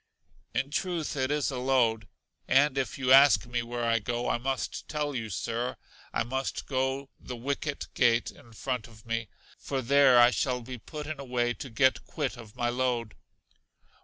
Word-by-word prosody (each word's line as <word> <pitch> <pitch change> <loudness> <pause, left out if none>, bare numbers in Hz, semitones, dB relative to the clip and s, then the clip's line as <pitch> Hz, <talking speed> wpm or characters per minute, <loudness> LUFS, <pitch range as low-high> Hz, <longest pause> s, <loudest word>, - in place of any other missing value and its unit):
In 140 - 0
truth, 170 -1 -2
it 130 -1 0
is 145 -1 0
a 130 - -3
load; 120 -5 +2 0.4
and 135 +1 +4
if 135 -1 -2
you 130 -1 0
ask 135 +1 +7
me 120 0 -2
where 120 0 -4
I 115 0 +2
go, 120 +3 -2
I - - +1
must 135 +1 -3
tell 150 -1 -2
you, 115 -4 -3
Sir, 115 +5 -2 0.4
I - - 0
must 130 +3 -3
go 130 0 -1
the - - -19
The 125 - -4
Wicket 140 +4 -3
Gate 120 -3 +3
in 115 - -18
front 125 0 -3
of 110 -1 -17
me, 115 -2 -2 0.3
for 135 - -3
there 135 0 +6
I 120 +1 +7
shall 125 -2 0
be 125 +1 -8
put 150 +6 -7
in 155 -1 -5
a - - -5
way 120 -2 0
to 135 - -8
get 130 +3 +2
quit 145 -5 -2
of 115 -3 -12
my 120 -1 0
load. 120 -3 -1
125 Hz, 190 wpm, -29 LUFS, 120-135 Hz, 0.4 s, ask